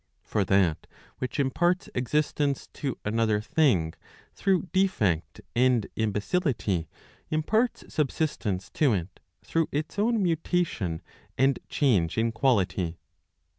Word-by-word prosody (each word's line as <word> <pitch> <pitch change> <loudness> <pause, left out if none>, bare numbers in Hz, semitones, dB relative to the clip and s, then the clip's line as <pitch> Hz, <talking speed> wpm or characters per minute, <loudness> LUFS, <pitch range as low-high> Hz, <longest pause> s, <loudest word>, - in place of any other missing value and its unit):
For 105 - 0
that 90 -5 +2 0.3
which 130 +3 -3
imparts 175 +7 +1
existence 140 +2 0
to. 135 -5 -3
another 110 0 +2
thing 110 - +2 0.4
through 190 -4 +1
defect 110 - +1
and 125 -3 +3
imbecility, 105 - 0 0.4
imparts 215 +10 +1
subsistence 130 - -1
to 140 -7 +3
it, 90 -2 -4 0.2
through 165 -1 0
its. 155 +6 -3
own 225 0 +2
mutation 165 - 0 0.3
and 135 0 +3
change 100 - +2
in 115 +1 +2
quality. 100 -8 +1
125 Hz, 105 wpm, -27 LUFS, 100-155 Hz, 0.4 s, and